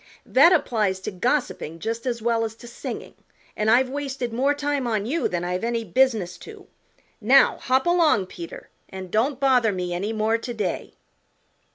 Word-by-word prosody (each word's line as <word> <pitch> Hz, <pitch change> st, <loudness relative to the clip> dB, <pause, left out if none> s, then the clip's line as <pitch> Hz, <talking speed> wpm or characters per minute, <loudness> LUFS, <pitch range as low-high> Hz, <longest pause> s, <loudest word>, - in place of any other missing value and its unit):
That 280 Hz, +7 st, +6 dB
applies 215 Hz, -, +1 dB
to -, -, -4 dB
gossiping 220 Hz, -, -2 dB
just 230 Hz, +8 st, -4 dB
as 235 Hz, -2 st, -2 dB
well 230 Hz, -1 st, +1 dB
as 225 Hz, -1 st, -4 dB
to 240 Hz, -, -13 dB
singing 235 Hz, -, -7 dB, 0.4 s
and 215 Hz, +1 st, 0 dB
I've 255 Hz, +3 st, +5 dB
wasted 265 Hz, -3 st, -4 dB
more 275 Hz, +5 st, +1 dB
time 285 Hz, -3 st, -1 dB
on 215 Hz, -3 st, -1 dB
you 310 Hz, +8 st, 0 dB
than 175 Hz, -1 st, -3 dB
I've 180 Hz, +2 st, -2 dB
any 230 Hz, 0 st, -1 dB
business 210 Hz, -4 st, +1 dB
to. 425 Hz, -3 st, -12 dB, 0.6 s
Now 260 Hz, +6 st, +5 dB
hop 260 Hz, +1 st, +1 dB
along, 335 Hz, -, +3 dB
Peter, 170 Hz, -2 st, -10 dB, 0.2 s
and 190 Hz, -2 st, -8 dB
don't 245 Hz, +6 st, +1 dB
bother 255 Hz, -5 st, +3 dB
me 180 Hz, -2 st, -3 dB
any 195 Hz, +5 st, -2 dB
more 220 Hz, +1 st, 0 dB
to 240 Hz, +1 st, -5 dB
day." 215 Hz, -, -3 dB
230 Hz, 175 wpm, -24 LUFS, 205-265 Hz, 0.6 s, That